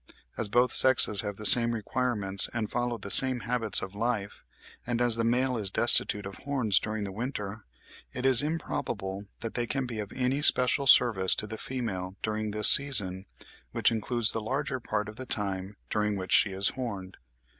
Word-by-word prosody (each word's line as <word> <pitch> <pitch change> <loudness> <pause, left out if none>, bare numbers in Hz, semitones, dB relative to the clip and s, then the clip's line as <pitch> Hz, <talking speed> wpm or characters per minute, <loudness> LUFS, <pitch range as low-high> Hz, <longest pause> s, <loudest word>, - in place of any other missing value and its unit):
As 110 - -2
both 120 +3 +1
sexes 130 -6 +3
have 105 -2 -7
the 105 - -10
same 120 +2 +7
requirements 110 -4 -1
and 110 -3 -5
follow 120 -1 -3
the 100 -2 -9
same 130 -2 +6
habits 120 -4 +1
of 95 0 -9
life, 105 -2 -5 0.4
and 120 -1 -4
as 120 -2 0
the 115 - -3
male 125 +2 -1
is 105 -3 -3
destitute 105 -1 +1
of 100 - -10
horns 130 -8 -1
during 110 0 -6
the 100 - -7
winter, 105 -2 -7 0.5
it 125 - -7
is 130 -3 +5
improbable 105 -10 -6 0.2
that 115 - -6
they 120 -1 -4
can 135 +1 -4
be 120 -3 -7
of 105 -1 -8
any 130 +2 -3
special 135 -1 +3
service 110 -7 +4
to - - -1
the 110 +1 -9
female 100 -8 -6
during 110 0 -4
this 105 0 +5
season, 100 -9 +3 0.5
which - - +1
includes 115 0 -1
the 115 - -5
larger 135 +4 -5
part 105 -3 -5
of 110 0 -12
the 130 0 -9
time 100 -2 -5
during 105 -1 -2
which 95 -1 -8
she 105 - +3
is 95 +1 0
horned. 100 -7 -8
110 Hz, 190 wpm, -26 LUFS, 100-125 Hz, 0.5 s, same